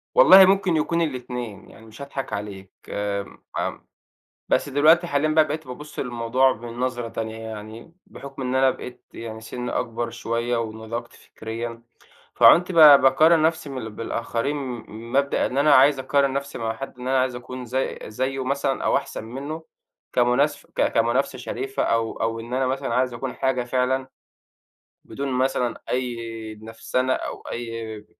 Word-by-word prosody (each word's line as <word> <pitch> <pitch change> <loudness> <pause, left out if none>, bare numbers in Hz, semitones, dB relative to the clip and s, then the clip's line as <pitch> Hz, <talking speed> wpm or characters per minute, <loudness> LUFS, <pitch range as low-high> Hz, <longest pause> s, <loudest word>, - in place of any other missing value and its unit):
والله 195 - +9
ممكن 190 -3 +2
يكون 170 +2 0
الاتنين، 125 -7 -4
يعني 110 - -15
مش 110 +5 -13
هاضحك 140 -1 -5
عليك 100 -2 -6 0.2
آآ، 100 -1 -3 0.2
امم - - -4 0.6
بس - - +1
دلوقتي 155 +5 +4
حاليًا 145 0 +1
بقى 155 0 +4
بقيت 155 -1 -5
بابُصّ 150 +4 -10
للموضوع 125 +1 +2
بنظرة 120 +1 -4
تانية، 110 0 -5
يعني 110 +5 -9
بحُكم 135 -1 -9
إن 125 0 -2
أنا 130 0 +4
بقيت 125 0 -8
يعني 110 -1 -7
سنِّي 125 +2 -5
أكبر 115 -1 -2
شوية 115 +1 -2
ونضجت 115 +1 -5
فكريًا، 115 +1 -7 0.5
فعُنت 180 +2 +6
ب - - -5
باقارن 155 +2 +7
نفسي 160 -2 0
من 125 -4 -5
بالآخرين 115 +4 -2
من 120 -3 -7
مبدأ 140 +1 +2
إن 135 - -3
أنا 145 0 +5
عايز 135 +1 +6
أقارن 135 +1 +1
نفسي 140 0 -4
مع 115 -1 -2
حد 135 -2 -8
إن 125 +1 -5
أنا 135 0 +3
عايز 130 -1 0
أكون 125 +1 -7
زي 130 +3 -2
زيه 130 +4 -2
مثلًا 135 0 -1
أو - - +3
أحسن - - -4
منه 140 +7 -6 0.5
كمناس 125 +4 +2
ك - - 0
كمنافسة 120 +4 +1
شريفة 405 0 -3
أو 115 -1 +1
أو 115 0 -1
إن 120 +2 -6
أنا 130 0 +1
مثلًا 135 -2 -2
عايز 125 -1 +1
أكون 130 +1 -5
حاجة 130 -2 0
فعلًا، 130 +1 0 1.0
بدون 135 -1 -4
مثلًا 125 -2 0
أي 125 -1 -1 0.5
نفسنة 125 +3 -2
أو - - -4
أي 115 -2 -6
125 Hz, 155 wpm, -23 LUFS, 115-140 Hz, 1.0 s, والله